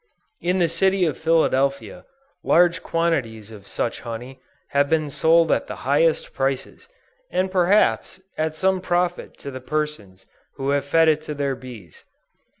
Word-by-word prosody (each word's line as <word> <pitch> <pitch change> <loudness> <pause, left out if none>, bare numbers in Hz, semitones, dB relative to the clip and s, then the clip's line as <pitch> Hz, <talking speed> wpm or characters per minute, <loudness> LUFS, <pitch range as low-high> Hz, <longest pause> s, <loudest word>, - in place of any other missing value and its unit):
In 180 +2 0
the 175 -2 +3
City 190 +3 +1
of 155 - -1
Philadelphia, 160 -1 0 0.4
large 175 0 +3
quantities 120 -11 -2
of 100 -2 -13
such 115 - -3
honey 125 +3 -8 0.3
have 140 0 +1
been 155 -2 0
sold 165 +2 +3
at - - 0
the - - -6
highest 150 +4 +2
prices, 135 - -3 0.4
and 185 +1 -1
perhaps 185 - +2 0.2
at 155 0 -2
some 190 +2 +1
profit 175 -1 -1
to 140 - -8
the 130 0 -8
persons 130 -10 -4 0.3
who 135 0 -3
have 140 -1 0
fed 165 +3 +3
it 155 -1 +3
to 155 -1 -6
their 140 -1 -1
bees. 120 -11 -12
150 Hz, 150 wpm, -22 LUFS, 130-170 Hz, 0.4 s, the